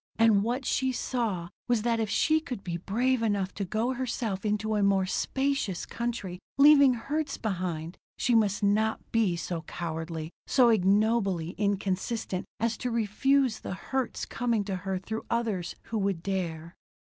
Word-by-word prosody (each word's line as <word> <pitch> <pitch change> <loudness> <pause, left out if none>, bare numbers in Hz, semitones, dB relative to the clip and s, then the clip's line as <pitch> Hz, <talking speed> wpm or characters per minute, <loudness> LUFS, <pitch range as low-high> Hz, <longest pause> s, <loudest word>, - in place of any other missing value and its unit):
And 225 -3 +5
what 245 +5 -1
she 260 +1 +1
saw 225 -9 -2 0.2
was 240 -3 +2
that 230 -1 +1
if 220 -2 -1
she 315 +9 +3
could 250 -10 -6
be 175 -2 -3
brave 240 +8 0
enough 200 -4 0
to 200 - -3
go 220 +7 -1
herself 235 -6 -3
into 215 +1 0
a 210 - +1
more 195 -1 +3
spacious 265 - -1
country, 230 -7 -4 0.2
leaving 280 -2 +7
hurts 290 +5 -2
behind, 175 -5 -3 0.2
she 245 - +1
must 210 -3 +2
not 215 +2 +1
be 220 -6 +2
so 170 0 -3
cowardly, 160 0 -5 0.2
so 250 -3 +5
ignobly 200 -4 +2
inconsistent 200 0 -1
as 230 0 0
to 250 - -2
refuse 235 +3 +2
the - - -5
hurts 265 +5 -3
coming 235 -3 0
to 195 -2 -3
her 190 +1 -3
through 220 +4 -5
others 215 -7 -1
who 225 - -1
would 195 -4 -1
dare. 170 -4 -3
215 Hz, 160 wpm, -28 LUFS, 190-235 Hz, 0.2 s, leaving